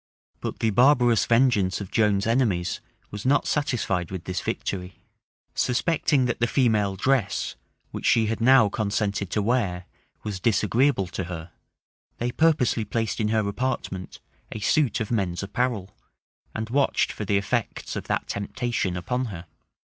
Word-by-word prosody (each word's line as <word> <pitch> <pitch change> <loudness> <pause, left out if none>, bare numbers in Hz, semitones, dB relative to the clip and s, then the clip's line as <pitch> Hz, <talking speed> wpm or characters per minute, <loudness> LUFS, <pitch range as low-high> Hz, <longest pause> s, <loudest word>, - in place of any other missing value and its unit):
But - - -4
the 115 - +2
barbarous 120 0 +4
vengeance 115 -6 +3
of 100 -3 -7
Joan's 105 -3 +2
enemies 110 -7 +1 0.3
was 105 0 -6
not 140 +3 +3
satisfied 115 - -1
with 95 -3 -6
this 90 - -3
victory. 90 -1 -4 0.6
Suspecting 140 +1 +1
that 120 - -1
the 120 - +2
female 110 -7 +2
dress, 120 -1 0 0.4
which - - -3
she 115 -1 +4
had 115 +1 -2
now 130 -2 +6
consented 100 -2 -1
to 105 - 0
wear, 100 -6 0 0.4
was 100 -3 -4
disagreeable 115 +3 +2
to 90 +1 -5
her, 85 -1 -7 0.7
they 120 +1 -2
purposely 145 -7 +2
placed 110 +1 -2
in 110 - +1
her 110 -1 +1
apartment 100 -4 -3 0.3
a 110 - -5
suit 125 +3 +1
of 110 - -3
men's 95 -5 -1
apparel; 105 -2 -2 0.6
and 110 +1 -4
watched 140 +1 +2
for - - -6
the 100 0 +1
effects 110 +3 -2
of - - -4
that - - -2
temptation 100 -2 -2
upon 125 +8 -2
her. 90 -7 -7
110 Hz, 150 wpm, -25 LUFS, 100-125 Hz, 0.7 s, now